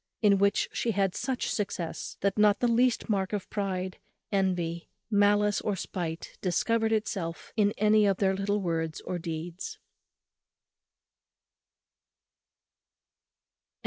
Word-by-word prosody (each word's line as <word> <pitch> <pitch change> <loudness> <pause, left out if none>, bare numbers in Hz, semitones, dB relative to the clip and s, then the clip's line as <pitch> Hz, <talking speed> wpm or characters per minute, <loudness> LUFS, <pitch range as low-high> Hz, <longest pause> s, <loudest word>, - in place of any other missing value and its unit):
In 200 -2 +5
which 200 0 +3
she 230 - 0
had 195 -2 +1
such 260 -2 -2
success, 180 -5 -3
that 200 0 +1
not 210 -1 +4
the 245 - +2
least 240 +1 +2
mark 195 -2 0
of 205 -2 -2
pride, 190 -3 -2 0.3
envy, 180 -4 0 0.2
malice, 205 0 +3
or 210 - -1
spite 170 -2 -5
discovered 225 +5 +1
itself 200 -6 -2
in 205 -2 +3
any 215 0 +4
of 195 -2 +2
their 195 -1 +2
little 200 +2 0
words 165 -3 -2
or 180 - -4
deeds. 165 +1 -5
200 Hz, 115 wpm, -29 LUFS, 180-210 Hz, 0.3 s, In